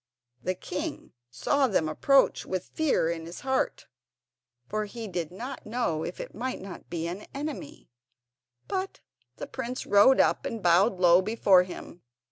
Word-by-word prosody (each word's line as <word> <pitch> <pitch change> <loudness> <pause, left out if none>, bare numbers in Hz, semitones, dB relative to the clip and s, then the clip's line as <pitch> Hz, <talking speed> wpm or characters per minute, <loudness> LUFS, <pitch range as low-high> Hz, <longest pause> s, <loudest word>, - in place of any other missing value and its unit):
The 185 - -1
king 310 - -5 0.2
saw 265 - +1
them 185 -8 +1
approach 270 - +3
with 185 -1 -4
fear 310 - +2
in 165 -1 -5
his 170 - -8
heart, 265 0 -1 0.8
for 215 0 -2
he 225 +2 -7
did 175 -4 -3
not 240 +9 -7
know 215 -9 -1
if 180 - -6
it - - -7
might 255 +3 -3
not 190 -1 -10
be 165 -1 -3
an 180 +5 -5
enemy; 300 - -6 0.8
but 385 -1 -3 0.3
the - - -6
prince 255 -1 -5
rode 205 +6 +6
up, - - +3
and 225 -3 -4
bowed 180 +3 +4
low 175 0 +6
before 200 -2 +4
him. 180 -1 -8
205 Hz, 155 wpm, -28 LUFS, 175-260 Hz, 0.8 s, rode